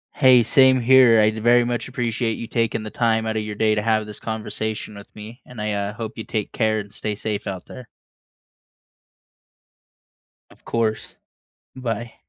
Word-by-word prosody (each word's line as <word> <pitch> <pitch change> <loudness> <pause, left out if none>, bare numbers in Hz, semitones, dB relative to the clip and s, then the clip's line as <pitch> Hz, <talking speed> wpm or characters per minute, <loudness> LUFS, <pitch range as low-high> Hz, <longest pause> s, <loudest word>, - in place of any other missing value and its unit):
Hey, 130 -3 +6
same 130 +3 +5
here. 125 -2 +6
I'd 110 +1 +2
very 120 +1 +5
much 120 0 -3
appreciate 120 -3 -2
you 115 - -6
taking 115 -1 -1
the 110 - -6
time 110 -1 0
outta 110 0 -1
your 105 -1 -5
day 110 0 +2
to 105 - 0
have 110 -1 +1
this 105 - -10
conversation 110 -1 -5
with 100 0 -11
me, 110 +4 -10
and 120 -3 -9
I, 105 0 -1
uh, 100 0 -3
hope 115 -1 -7
you 110 - -5
take 105 -2 -3
care 110 -2 0
and 100 -1 -8
stay 105 +1 -3
safe 105 0 -4
out 95 -3 -6
there. 125 -2 -11 2.6
Of - - -22
course. 110 -1 -2 0.6
Bye. 115 -2 -4
110 Hz, 170 wpm, -22 LUFS, 105-120 Hz, 2.6 s, Hey